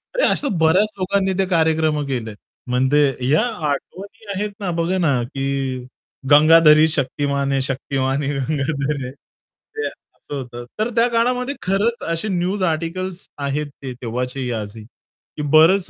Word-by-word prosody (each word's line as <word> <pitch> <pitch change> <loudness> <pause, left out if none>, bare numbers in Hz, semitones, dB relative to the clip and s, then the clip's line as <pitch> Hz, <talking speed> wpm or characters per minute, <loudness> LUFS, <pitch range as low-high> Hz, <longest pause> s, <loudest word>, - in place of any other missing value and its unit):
अरे, - - +2
असं 240 - -1
बऱ्याच 185 +7 +3
लोकांनी 190 +1 +1
ते 195 - +3
कार्यक्रम 160 -3 +2
केलेत. 115 -5 -4 0.3
म्हणजे 130 +4 +2 0.3
या 155 +3 +4 0.3
आठवणी 200 +10 -6
आहेत 205 +2 -2
ना 195 -3 -3
बघा 170 +3 0
ना, 145 -9 +2
की 135 0 -2 0.5
गंगाधर 155 +1 +7
ही 155 +1 +6
शक्तिमान 140 -2 -1
है 135 - +2
शक्तिमान 135 +1 -1
ही 140 +1 -1
गंगाधर 140 +1 -1
है 125 - -6
ते 440 - -11
असं 145 - -11
होतं. 120 -3 -7
तर 220 +2 +1
त्या 235 +1 +4
काळामध्ये 250 +3 0
खरंच 205 +6 0
असे 165 +6 -2
न्यूज 185 +2 -1
आर्टिकल्स 175 +2 -2
आहेत 145 +1 -2 0.2
ते 130 -2 -4
तेव्हाचे 125 +2 -3
आजही. 110 0 -6 0.5
की 150 - -2
बरच 175 +5 +5
155 Hz, 145 wpm, -20 LUFS, 135-190 Hz, 0.5 s, गंगाधर